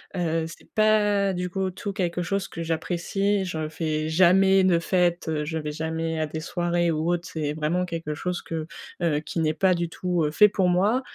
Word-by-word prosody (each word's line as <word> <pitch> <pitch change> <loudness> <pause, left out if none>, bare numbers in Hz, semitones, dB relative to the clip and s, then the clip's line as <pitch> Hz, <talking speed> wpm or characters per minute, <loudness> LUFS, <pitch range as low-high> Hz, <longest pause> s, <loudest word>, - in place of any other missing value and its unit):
Heu, 165 -2 0
c'est 165 - -13
pas 210 -2 +3
du 180 0 -3
coup 190 +1 -2
tout 200 +2 -5
quelque 180 -3 -1
chose 195 +2 -2
que 165 - -5
j'apprécie, 190 +4 -1
je 160 -3 -3
fais 155 -1 -2
jamais 190 +3 +5
de 180 -2 +4
fête, 175 -1 +1
heu, 150 -1 -1
je 160 +1 -3
vais 150 -1 -3
jamais 160 +1 -3
à 155 - 0
des 160 +1 -5
soirées 175 0 0
ou 160 +2 0
autre, 175 -1 -2
c'est 150 -2 -2
vraiment 155 +4 0
quelque 165 -3 -4
chose 180 +4 -3
que, 160 -1 -5 0.3
heu, 160 -4 +1
qui 165 - -4
n'est 155 -1 +1
pas 185 +4 +3
du 170 -1 -1
tout, 175 0 -1
heu, 150 - -1
fait 210 +6 +6
pour 190 -2 +1
moi. 200 +8 +2
175 Hz, 210 wpm, -25 LUFS, 160-185 Hz, 0.3 s, fait